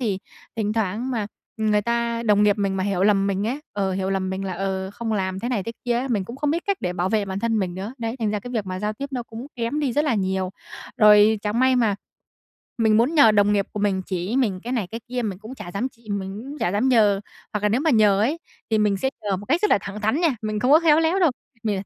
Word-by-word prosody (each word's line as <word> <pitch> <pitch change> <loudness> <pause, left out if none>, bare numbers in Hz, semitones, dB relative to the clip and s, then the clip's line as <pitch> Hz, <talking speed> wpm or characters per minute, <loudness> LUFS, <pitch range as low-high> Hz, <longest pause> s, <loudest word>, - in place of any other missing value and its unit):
thì 210 -6 -1 0.4
thỉnh 210 -2 0
thoảng 220 +3 -1
mà 225 -5 -1 0.3
người 215 -2 +1
ta 235 +1 -1
đồng 210 -3 +3
nghiệp 205 -1 +4
mình 195 -1 0
mà 190 - -1
hiểu 195 -2 0
lầm 200 -1 +3
mình 200 +1 -1
ấy, 260 +6 -2
ờ, 195 -2 -1
hiểu 190 0 -2
lầm 190 -1 -1
mình 190 +1 -3
là, 190 - -3
ờ, 190 +1 -3
không 225 +2 -4
làm 190 -2 -1
thế 240 - -3
này 240 -6 -1
thế 230 - -5
kia 240 -1 +1
ấy, 260 +2 -3
mình 210 -6 0
cũng 235 +6 -8
không 290 +1 0
biết 335 +3 -1
cách 400 -1 +1
để 180 - -2
bảo 180 +1 -1
vệ 215 0 +1
bản 190 -1 -4
thân 225 +1 0
mình 185 -3 -2
nữa. 195 +5 -5
Đấy, 230 +1 -3
thành 220 -3 0
ra 210 -1 -2
cái 245 - -8
việc 220 -5 -2
mà 185 0 -4
giao 210 +1 -2
tiếp 275 +6 -6
nó 250 -2 -2
cũng 230 +2 -9
kém 235 +5 -1
đi 275 -4 0
rất 295 +5 +1
là 290 -6 +1
nhiều. 190 -2 -1 0.5
Rồi 210 0 +6
chẳng 215 +3 0
may 260 0 +4
mà 225 -5 +2 0.8
mình 220 -2 +4
muốn 245 +8 +2
nhờ 285 -8 +7
đồng 205 0 +4
nghiệp 200 -1 +1
của 210 - -4
mình 195 -2 +1
chỉ 185 +5 -2
mình 210 -9 +1
cái 245 - -4
này 230 -7 -1
cái 230 - -5
kia 250 0 -2
mình 200 -5 -3
cũng 220 +5 -9
chả 210 -8 -8
dám 240 +6 -1
chị 235 -4 -15
mình 200 +1 -4
cũng 285 +3 -8
chả 175 - 0
dám 215 +6 +1
nhờ. 210 -6 +4 0.3
Hoặc 210 - -2
là 210 - +3
nếu 225 +5 +1
mà 320 +2 +2
nhờ 210 -5 +4
ấy, 275 +10 +1 0.3
thì 220 - +3
mình 210 -2 +2
sẽ 265 +7 -1
nhờ 200 -2 0
một 200 +2 -9
cách 320 +6 +2
rất 420 - +3
là - - +5
thẳng 200 +2 -7
thắn 220 +8 +1
nha, 320 -8 +2
mình 215 -1 -2
không 250 - +2
có 310 - +8
khéo 320 -2 +5
léo 325 +4 +2
đâu. 345 -5 +4 0.3
Mình 210 -4 -1
215 Hz, 290 wpm, -23 LUFS, 195-245 Hz, 0.8 s, có